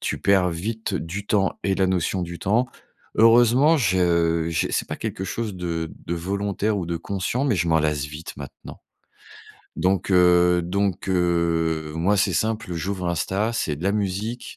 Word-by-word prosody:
Tu - - -2
perds 95 -2 +3
vite 110 +7 -4
du 95 +5 -4
temps 100 -2 +1
et 95 -1 +1
la 95 -1 +2
notion 95 0 0
du 85 -1 -6
temps. 115 +6 +1 0.5
Heureusement, 120 +7 +5
je 85 - +2
je 85 - 0
c'est - - -1
pas - - -4
quelque 95 - -4
chose 110 +2 -4
de 85 -3 -4
de 85 - -1
volontaire 100 +4 -1
ou 85 - -4
de 85 - -2
conscient, 100 +9 -2
mais 130 -8 +1
je 85 0 0
m'en 80 0 +4
lasse 75 -2 0
vite 75 +3 -8
maintenant. 70 -1 -10 1.0
Donc, 95 +1 0
heu 90 -1 +5
donc, 95 +1 -1
heu, 85 -3 0
moi, 90 +6 +1
c'est 95 - +2
simple, 110 -4 -1
j'ouvre 90 +2 -3
Insta, 95 +6 -1
c'est 80 -10 -2
de 75 - -9
la 100 - +2
musique, 105 +4 -3
95 Hz, 175 wpm, -23 LUFS, 85-100 Hz, 1.0 s, Heureusement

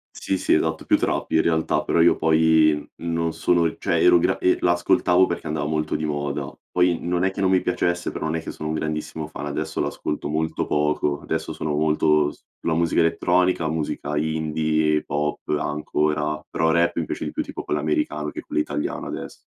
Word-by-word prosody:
Sì 95 - -2
sì, - - +1
esatto, 80 0 0
più - - +4
trap - - -1
in 80 - +4
realtà, 80 -2 +1
però 80 - +1
io 85 +1 +6
poi 80 -1 +3
non 85 -1 -2
sono 85 -1 +2
e 80 - -2
cioè - - 0
ero 85 - +6
gra - - +1
e 90 - +2
l'ascoltavo 90 +1 +3
perché 85 -3 -4
andava 75 -1 -2
molto 75 0 -1
di 80 - -2
moda. 70 -1 -3 0.2
Poi 90 -1 +2
non 90 +1 -1
è 95 - +2
che 95 - -5
non 95 - +3
mi 95 -1 +3
piacesse, 90 0 -1
però - - -4
non 80 +1 -1
è 80 - -2
che - - -5
sono 75 - -6
un 80 - -1
grandissimo 80 0 -3
fan, 75 -1 -7
adesso 70 - -3
l'ascolto 75 - -3
molto 80 +1 -1
poco. 75 -1 0
Adesso - - -3
sono 75 -1 -3
molto 75 -1 +3
s - - -19 0.2
la 80 - 0
musica 85 0 +1
elettronica, 90 0 +2
musica 75 -1 -3
indie, 80 0 0
pop 75 0 -2 0.2
ancora, 75 0 -1
però 80 - 0
rap 85 +1 +2
mi 80 - -1
piace - - -4
di - - -4
più - - -2
tipo - - -6
quello 75 - -1
americano 75 0 -1
che - - -7
quello 75 - -1
italiano 75 0 -3
adess - - -7
80 Hz, 200 wpm, -23 LUFS, 75-85 Hz, 0.2 s, io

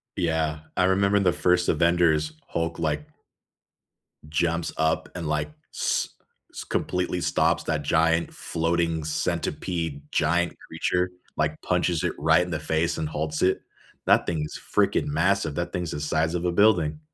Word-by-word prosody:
Yeah, 80 -2 0 0.2
I 90 - +3
remember 100 +2 +3
the 95 -3 +3
first 90 0 +2
Avengers, 80 -2 +3
Hulk, 85 0 -2
like 75 -2 -1 1.2
jumps 85 +2 0
up 80 0 +1
and, 85 -3 -4
like, 75 0 -1 0.2
s - - 0 0.4
s - - -6
completely 90 -1 -1
stops - - +2
that 75 -1 -1
giant, 80 +3 +2
floating 85 -1 -1
centipede 80 0 -2
giant 85 +2 +1
creature, 90 +2 0 0.3
like 75 0 0
punches 90 -2 +1
it - - 0
right 80 +2 +4
in 90 - -6
the 80 - -1
face 80 +1 0
and 80 -1 -2
halts 75 0 -3
it. 95 +1 +2 0.4
That - - +4
thing 80 -3 -1
is - - -8
freaking - - +2
massive, 80 0 +1
that 85 0 -2
thing 90 - -1
is 85 - -4
the 75 - -4
size 80 +2 0
of 90 0 -2
a 90 - +2
building. 100 - +3
85 Hz, 160 wpm, -25 LUFS, 80-90 Hz, 1.2 s, right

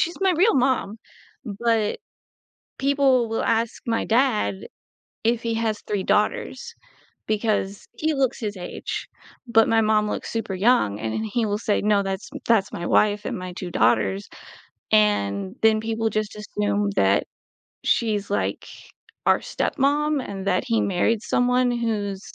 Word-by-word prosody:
she's 340 +2 -1
my 380 -1 +3
real 375 +7 +3
mom, 250 -5 +1 0.5
but 220 0 0 0.8
people 270 -3 +3
will 225 - -1
ask 230 0 0
my 230 -1 0
dad 225 - +2 0.7
if 230 +1 +1
he 230 -1 -1
has 225 -2 -1
3 205 -2 -2
daughters 465 - -1 0.5
because 210 -2 -1
he 315 0 0
looks 270 -2 0
his 210 -2 -3
age, 175 - -5 0.4
but 225 -1 +4
my 225 - +4
mom 215 -1 +2
looks - - -4
super 225 -4 -3
young 185 - +2
and 110 -1 -3
then 220 - -2
he 220 +1 -1
will 205 0 -1
say, 210 -1 0
"No, 205 -1 +2
that's 195 +1 -4 0.2
that's 220 -4 +2
my 175 - -4
wife 210 0 +2
and - - -3
my 180 0 -6
2 175 0 -6
daughters." 105 - +1 0.7
and 100 -2 +2
then 220 -1 +4
people, 225 0 -1
just, 215 -1 -2
assume 105 - -1
that 100 0 +3 0.6
she's, 210 -3 +1
like, 205 - -1 0.6
our - - +4
stepmom 295 +1 0
and 195 -1 -6
that 185 -2 +1
he 230 -2 +1
married 200 +4 +1
someone 250 0 +2
who's 215 -5 -2
215 Hz, 150 wpm, -23 LUFS, 195-235 Hz, 0.8 s, but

